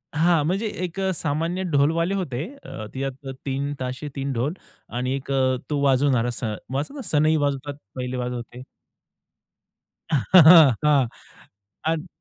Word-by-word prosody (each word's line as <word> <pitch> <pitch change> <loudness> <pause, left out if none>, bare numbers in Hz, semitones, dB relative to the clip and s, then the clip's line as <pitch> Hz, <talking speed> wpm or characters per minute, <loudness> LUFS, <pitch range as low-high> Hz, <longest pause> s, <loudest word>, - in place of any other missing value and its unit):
हां. 165 0 +3
म्हणजे 195 +7 0 0.2
एक 180 +1 -4 0.2
सामान्य 165 +5 -1
ढोलवाले 165 +6 +2
होते, 145 -9 -3 0.2
अ, 110 - -7
ते 135 +1 -2 0.4
3 140 +1 -2
ताशे 130 +3 -4
3 135 0 -2
ढोल 130 +6 -1 0.4
आणि 130 +2 -1
एक 140 0 -6
अ, 130 -1 +2
तो 145 -1 0
वाजवणारा 130 -3 +3
सन 110 -3 -2 0.2
वाजत 155 - -3
सनई 155 +1 +3
वाजवतात 145 -1 -1 0.2
पहिले 125 0 -4
वाजवते. 125 0 -5 1.5
हां. 150 - +6 0.8
अग 160 +2 -1
140 Hz, 125 wpm, -23 LUFS, 130-160 Hz, 1.5 s, हां